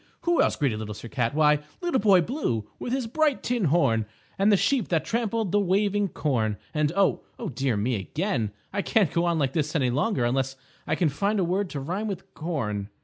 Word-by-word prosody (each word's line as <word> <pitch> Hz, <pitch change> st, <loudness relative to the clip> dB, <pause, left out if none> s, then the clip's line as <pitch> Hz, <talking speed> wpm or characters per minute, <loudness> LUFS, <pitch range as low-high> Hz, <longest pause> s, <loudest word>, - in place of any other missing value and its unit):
Who 345 Hz, -1 st, +2 dB
else -, -, +2 dB
greeted 130 Hz, -8 st, 0 dB
Little 105 Hz, -1 st, -5 dB
Sir 115 Hz, -, -9 dB
Cat? 125 Hz, 0 st, -1 dB
Why, 150 Hz, -1 st, +4 dB, 0.2 s
Little 345 Hz, -6 st, 0 dB
Boy 200 Hz, -3 st, +5 dB
Blue 160 Hz, -, -2 dB
with 240 Hz, -, -4 dB
his 260 Hz, -1 st, 0 dB
bright 295 Hz, +4 st, +1 dB
tin 240 Hz, -5 st, 0 dB
horn, 115 Hz, -9 st, +2 dB, 0.3 s
and 200 Hz, +2 st, +4 dB
the 200 Hz, -, +5 dB
Sheep 260 Hz, 0 st, +1 dB
that 165 Hz, -3 st, 0 dB
Trampled 225 Hz, -3 st, -1 dB
the 205 Hz, -, +3 dB
Waving 200 Hz, +1 st, +2 dB
Corn, 115 Hz, -, -1 dB, 0.2 s
and, 150 Hz, -1 st, +1 dB
oh, 195 Hz, -1 st, +2 dB, 0.3 s
dear 130 Hz, -3 st, 0 dB
me 115 Hz, +5 st, 0 dB
again, 120 Hz, -, -2 dB, 0.2 s
I 200 Hz, -, 0 dB
can't 195 Hz, -5 st, +2 dB
go 170 Hz, +1 st, +2 dB
on 170 Hz, -1 st, +1 dB
like 135 Hz, -3 st, 0 dB
this 150 Hz, -1 st, -1 dB
any 130 Hz, -5 st, +2 dB
longer, 140 Hz, -, +1 dB
unless 135 Hz, +2 st, 0 dB, 0.3 s
I -, -, +1 dB
can 170 Hz, -4 st, +2 dB
find 200 Hz, +9 st, 0 dB
a -, -, +2 dB
word 185 Hz, +2 st, 0 dB
to 145 Hz, -, -4 dB
rhyme 185 Hz, +10 st, -3 dB
with 195 Hz, -3 st, -6 dB
corn. 110 Hz, -, -3 dB
165 Hz, 210 wpm, -26 LUFS, 130-205 Hz, 0.3 s, Boy